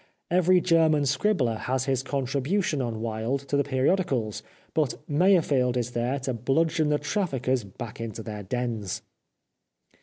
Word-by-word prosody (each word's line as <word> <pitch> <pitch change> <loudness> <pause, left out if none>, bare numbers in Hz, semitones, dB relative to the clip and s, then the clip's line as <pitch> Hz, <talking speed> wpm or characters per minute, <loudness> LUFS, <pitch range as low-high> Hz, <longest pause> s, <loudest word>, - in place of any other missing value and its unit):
Every 180 +1 +5
German 160 -4 +3
scribbler 135 - +1
has 130 0 -1
his 135 -2 +1
contribution 140 +5 -1
on 115 -3 -3
Wilde 115 +4 -2
to - - +1
the 140 - +3
periodicals, 130 - 0 0.3
but 150 -7 +1
Meyerfeld 145 -7 +3
is 120 0 -2
there 120 +3 -1
to 130 0 -2
bludgeon 155 +6 +1
the 150 - +3
traffickers 140 - -1
back 110 +4 -8
into 110 -1 -5
their 105 -1 -6
dens. 110 -2 -3
130 Hz, 140 wpm, -26 LUFS, 120-155 Hz, 0.3 s, Every